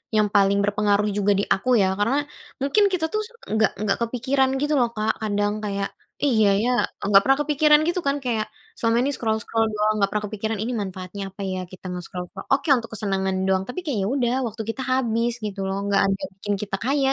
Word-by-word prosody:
yang 215 -1 +4
paling 200 -1 +4
berpengaruh 205 0 +2
juga 205 0 +2
di - - +1
aku 225 +7 -3
ya. 190 0 +2
Karena 265 +8 +1 0.4
mungkin 285 +10 +3
kita 330 -3 +1
tuh 430 - +1 0.3
nggak 220 -1 +3
nggak 200 - +1
kepikiran 260 +3 +1
gitu 295 +1 +1
loh 240 -1 +2
Kak 215 +1 +1
kadang 205 -1 0
kayak, 200 -1 -2 0.4
iya 220 -7 +4 0.2
ya, 245 - +1 0.4
nggak 200 -1 +6
pernah 270 +1 +3
kepikiran 300 0 +5
gitu 345 +2 0
kan 280 +1 +2
kayak 225 -3 0 0.3
selama 230 0 +1
ini 285 - +1
scroll-scroll 225 0 0
doang 215 0 +1
nggak 195 - +3
pernah 210 0 -2
kepikiran 215 +1 -3
ini 240 - -2
manfaatnya 190 +1 -6
apa 195 +1 -11
ya 185 -1 -2
kita 185 0 -13
mau 180 - -4
nge-scroll 180 +1 -6
ko - - -9
oke 275 +4 +2
untuk 230 -1 -6
kesenangan 195 -2 -1
doang, 190 0 +2
tapi 250 - -4
kayak 285 -8 -1
ya 195 - 0
udah, 245 -3 +1
waktu 225 +1 -6
kita 245 - -3
habis 235 -2 +1
gitu 205 -1 -5
loh, 195 - -2
nggak 200 -1 +3
ada 195 0 +1
yang - - -5
bikin 205 - -1
kita 195 -1 -3
kaya, 275 +2 +2
215 Hz, 215 wpm, -23 LUFS, 200-255 Hz, 0.4 s, nggak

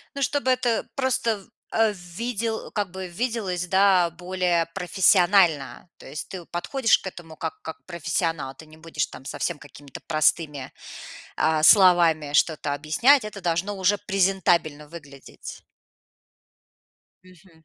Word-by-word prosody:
Ну, 280 - -4
чтобы 260 -1 +1
это 245 -3 0
просто, 235 -6 0 0.3
э, 225 -1 +2
в - - -12
видел 220 +5 -4
как 205 -4 -3
бы 190 -1 -6
виделось, 190 -3 -3
да, 190 -2 +3
более 180 0 -1
профессионально. 175 - +2
То - - -14
есть 145 +2 -7
ты 185 -2 -8
подходишь 225 +8 +1
к - - -13
этому 165 -3 -12
как 160 0 -6
как 160 - -9
профессионал. 165 -4 -3
Ты 160 - -14
не 155 +1 -17
будешь 160 -2 -3
там 130 - -12
совсем 170 +3 -3
какими-то 145 -1 -12
простыми, 155 -3 0 0.6
а, 155 -1 +1
словами 170 -6 +5
что-то 150 -1 +1
объяснять. 215 - +3
Это 205 -2 -8
должно 175 +4 -1
уже 195 +2 +2
презентабельно 185 -6 0
выглядеть. 145 -4 -12 1.6
Мгм. 180 -3 -21
175 Hz, 135 wpm, -24 LUFS, 160-200 Hz, 1.6 s, словами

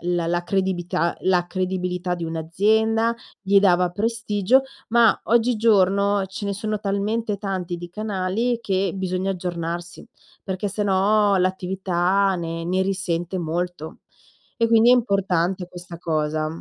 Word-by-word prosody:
la 170 -1 -1
la 175 0 0
credibilità 180 -2 -1
la 180 -2 +2
credibilità 180 -1 -2
di 170 -1 -4
un'azienda, 220 +8 +1 0.3
gli 200 0 +4
dava 180 -2 +3
prestigio; 225 +3 +1 0.3
ma 235 -1 +4
oggigiorno, 205 -4 +3
ce 195 +2 -6
ne 200 - -1
sono 215 +1 -3
talmente 205 +1 -1
tanti 185 -3 -3
di 175 0 -8
canali, 215 +4 -2
che 195 -4 0
bisogna 185 0 -2
aggiornarsi, 175 -1 -5 0.4
perché 190 +1 -3
se 210 +1 -2
no 205 +1 +3
l'attività, 185 +1 +1
ne 165 -1 -4
ne 185 +2 0
risente 185 -2 -2
molto; 170 -1 -4 0.5
e 230 -1 +1
quindi 230 +1 +5
è - - +8
importante 190 -6 0
questa 175 -1 -10
cosa. 155 -2 -1
190 Hz, 130 wpm, -23 LUFS, 175-205 Hz, 0.5 s, è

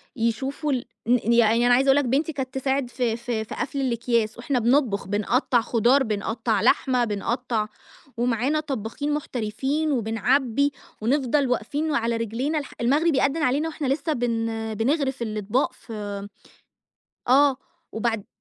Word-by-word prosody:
يشوفوا 265 +6 -1
ال 255 -3 -1 0.2
ن 235 -1 +3
ي 235 - +4
يعني 230 +1 +4
أنا 245 - +5
عايزة 265 +2 +3
اقول 270 - +6
لك 285 - +2
بنتي 285 +6 0
كانت 265 -2 -4
تساعد 265 -1 -1
في 240 -3 -1
في 235 -2 -3
في - - -8
قفل 275 0 -3
الاكياس، 235 -3 0
وإحنا 250 +1 -1
بنطبخ 235 -5 +2
بنقطَّع 235 +4 +1
خضار، 245 +4 +3
بنقطَّع 215 0 -1
لحمة، 255 -3 +3
بنقطَّع 215 +1 -2 0.5
ومعانا 245 +5 +1
طبَّاخين 285 0 -3
محترفين، 275 +3 -2
وبنعبِّي 250 +3 +1 0.3
ونفضل 270 +3 +1
واقفين 285 +6 -1
وعلى 235 -4 0
رجلينا 240 +8 -2
الح 280 - -9
المغرب 290 +5 +3
يأدِّن 280 +4 +1
علينا 285 +6 +1
واحنا 300 -3 -4
لسه 295 +4 0
بن 225 -3 -2
بنغرف 270 +3 0
الاطباق 215 +2 -1
في 205 -3 -7 1.0
آه 270 +1 +5 0.3
وبعد 225 -2 -2
245 Hz, 145 wpm, -24 LUFS, 225-275 Hz, 1.0 s, اقول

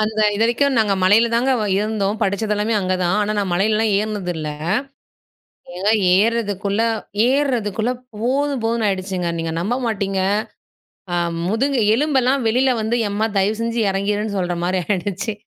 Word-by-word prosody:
அந்த 215 0 -1 0.2
இதுவரைக்கும் 240 +5 +1
நாங்க 210 -3 +2
மலையில 215 +5 +5
தாங்க 255 +3 +2
வ - - 0
இருந்தோம். 210 0 -1
படிச்சது 205 +2 0
எல்லாமே 210 +2 0
அங்க 185 -1 0
தான். 175 +3 +1
ஆனா, 210 +1 -1
நான் 200 -2 -1
மலையிலலாம் 215 +4 +1
ஏறினது 205 -4 -2
இல்ல. 155 -1 -4 1.3
ஏங்க 190 +3 0 0.3
ஏறுறதுக்குள்ள, 205 -2 0 0.5
ஏறுறதுக்குள்ள 245 -5 0 0.2
போதும் 265 +4 -1
போதுன்னு 225 0 0
ஆயிடுச்சுங்க. 185 -2 -2
நீங்க 165 0 -3
நம்ப 205 +8 -1
மாட்டீங்க. 195 -3 -1 0.9
அ - - +1 0.3
முதுகு 255 +6 0 0.2
எலும்பெல்லாம் 270 -1 +1
வெளில 255 +4 +3
வந்து, 220 +2 0
எம்மா! 205 +2 0
தயவுசெஞ்சு 225 +4 0
இறங்கிருன்னு 205 +2 -1
சொல்றமாரி 175 +1 -1
ஆயிடுச்சு. 200 +2 -2
215 Hz, 135 wpm, -20 LUFS, 195-230 Hz, 1.3 s, மலையில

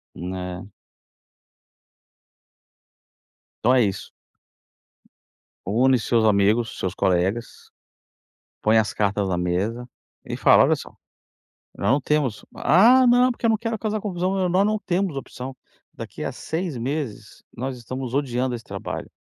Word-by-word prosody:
É. 90 0 -6 3.0
Então 125 - +4
é 130 - +5
isso. 95 -2 -4 1.5
Une 125 +6 +3
seus 115 0 +1
amigos, 105 +3 +2
seus 95 - -2
colegas, 95 +4 -1 0.9
põe 110 +1 +4
as 110 -1 +1
cartas 100 -1 0
na 90 - 0
mesa 100 +8 -2 0.4
e - - -5
fala: - - +6
"Olha - - +3
só, - - -9 0.9
já - - -6
não 140 +3 +3
temos", 135 -6 -1
"Ah, 245 +9 +5
não, 245 +1 +5
porque 240 -1 -2
eu - - +4
não 220 - +3
quero 225 0 -3
causar 215 0 -2
confusão", 185 -1 -1
"Nós 185 +3 +3
não 215 0 0
temos 185 -5 -1
opção, 130 -1 -7 0.4
daqui - - -8
a - - -3
6 165 -2 -4
meses, 120 -4 -5
nós 130 +1 -4
estamos 130 +1 -6
odiando 130 -2 -1
esse 115 -2 -7
trabalho, - - -6
125 Hz, 130 wpm, -23 LUFS, -, 3.0 s, fala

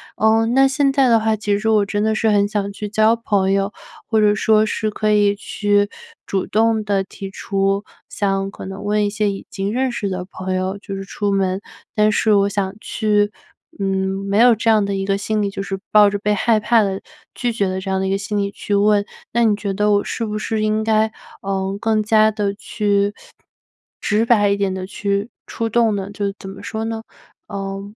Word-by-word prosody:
呃， 220 +1 +3
那 265 +4 +4
现 275 0 +1
在 270 -2 +4
的 230 - +5
话， 220 0 +1
其 205 -1 0
实 220 +2 -1
我 215 -2 +4
真 205 0 -1
的 220 0 +2
是 220 +1 +1
很 205 -1 +3
想 200 -1 -2
去 210 +1 -6
交 215 +2 +3
朋 200 -4 0
友， 195 +2 0 0.3
或 220 - +2
者 210 0 +4
说 215 +1 +3
是 215 0 -1
可 215 0 0
以 205 -1 +3
去 205 0 0 0.4
主 195 -1 -1
动 220 0 +2
地 200 -2 0
提 195 0 -9
出 195 +1 -1 0.2
想 195 -1 -1
可 - - -9
能 195 +1 -7
问 210 0 +1
一 - - -1
些 210 0 0
已 195 - -8
经 195 +2 -3
认 260 +1 0
识 215 -4 -3
的 185 -2 -3
朋 185 0 -5
友 185 +1 -1
就 200 -1 -7
是 195 - -5
出 200 +1 -2
门。 190 -1 0 0.4
但 215 0 +4
是 215 +1 +2
我 200 -1 +4
想 195 -1 -2
去， 210 -2 0 0.5
嗯， 195 0 -1
没 200 +1 0
有 240 +1 +7
这 225 +1 0
样 215 -2 +4
的 200 - -2
一 195 0 -2
个 195 0 +1
心 210 +2 -1
理， 200 - 0
就 195 - -5
是 195 -1 -4
抱 210 -1 +7
着 205 - -2
被 210 +1 +1
害 220 +1 +2
怕 225 +2 +3
地 195 -1 -2 0.3
拒 245 -2 -1
绝 205 -4 0
的 185 0 -2
这 190 - -5
样 190 - +1
的 190 - -1
一 - - -1
个 195 - +1
心 205 +1 -3
理 200 0 -1
去 205 - -5
问。 205 0 +3 0.3
那 235 +1 +2
你 215 -2 +3
觉 205 -1 -3
得 210 +1 +1
我 205 0 +3
是 230 - -3
不 215 -1 -3
是 215 0 -2
应 215 0 +1
该， 220 0 +2 0.3
呃， 195 0 -2
更 220 -1 +1
加 215 0 +4
地 205 -2 -1
去 205 -1 0 0.9
直 215 +1 +1
白 210 -4 +4
一 200 - +1
点 195 -2 0
地 185 0 -4
去 200 +1 -2 0.2
出 225 0 -3
动 225 -1 +2
呢？ 195 0 -4
就 205 -1 -2
怎 190 - -8
么 195 - -10
说 220 0 -4
呢？ 225 0 -4 0.4
呃， 195 0 -5
205 Hz, 240 characters per minute, -20 LUFS, 195-220 Hz, 0.9 s, 有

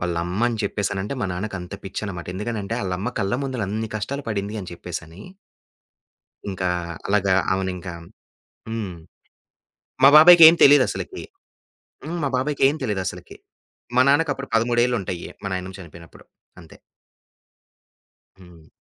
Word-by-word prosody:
వాళ్ళమ్మని 90 +7 -1
చెప్పేసనంటే 100 +3 -2
మా - - 0
నాన్నకంత 95 -1 -5
పిచ్చననమాట. 95 -2 -6
ఎందుకనంటే 105 +1 -4
ఆళ్ళమ్మ 95 +1 -3
కళ్ళ 100 +3 -1
ముందుల 130 -5 -3
అన్ని 110 +2 -3
కష్టాలు 140 +7 -4
పడింది 105 -1 -3
అని 90 - -8
చెప్పేసని 85 0 -8 1.3
ఇంకా 95 -1 -2 0.4
అలాగా 100 -1 +2 0.2
అవనింకా 95 -2 -4 0.8
హ్మ్. 110 -5 -4 1.1
మా 135 - +10
బాబాయ్‌కేం 165 0 +9
తెలీదసలకి? 145 - +3 0.8
హ్మ్. 170 +2 -4
మా 140 - 0
బాబాయ్‌కేం 140 +1 +1
తెలీదసలకి. 100 -6 -4 0.6
మా 125 - +6
నాన్నకప్పుడు 145 -2 +1
పదముడేళ్ళుంటాయి. 120 -6 0
మా - - -4
నాయనమ 95 +1 -5
చనిపోయినప్పుడు. 85 -1 -14 0.4
అంతే. 80 - -16 1.6
హ్మ్. 85 -4 -17
100 Hz, 105 wpm, -22 LUFS, 90-125 Hz, 1.6 s, మా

